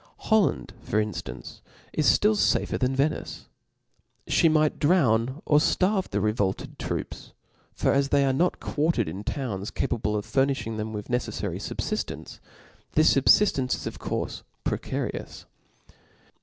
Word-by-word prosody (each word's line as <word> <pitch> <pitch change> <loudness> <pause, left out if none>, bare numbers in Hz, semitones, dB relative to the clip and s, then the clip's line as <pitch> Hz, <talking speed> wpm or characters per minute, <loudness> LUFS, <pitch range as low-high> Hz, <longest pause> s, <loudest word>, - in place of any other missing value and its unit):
Holland, 220 -3 +2
for 105 - -2
inftance, 105 -5 -5 0.3
is 155 - +1
ftill 210 - +5
fafer - - +1
than 130 0 +1
Venice; 140 +3 -1 0.8
fhe 165 - +4
might 155 -1 +2
jdrown 135 -5 +2
or 150 - +5
ftarve 190 +5 +1
fhe 100 - -1
revolted 105 -2 -1
troops; - - -5 0.4
for - - +1
as 140 0 +2
they 140 -1 +3
are 135 - +2
not 175 +7 +1
quartered 150 - 0
in 95 +6 -6
towns 105 -7 -3
capable 115 -5 -1
of 105 0 -2
furnifhing 135 -1 0
them 110 0 -3
with 105 -1 -6
neceflary 125 0 -2
fubfiftence, - - -4 0.5
this 155 +1 +5
i^bfiftence 135 -2 +4
is - - -8
of - - -6
cpurfc - - -3 0.2
precarious. - - -4
135 Hz, 135 wpm, -26 LUFS, 110-155 Hz, 0.8 s, ftill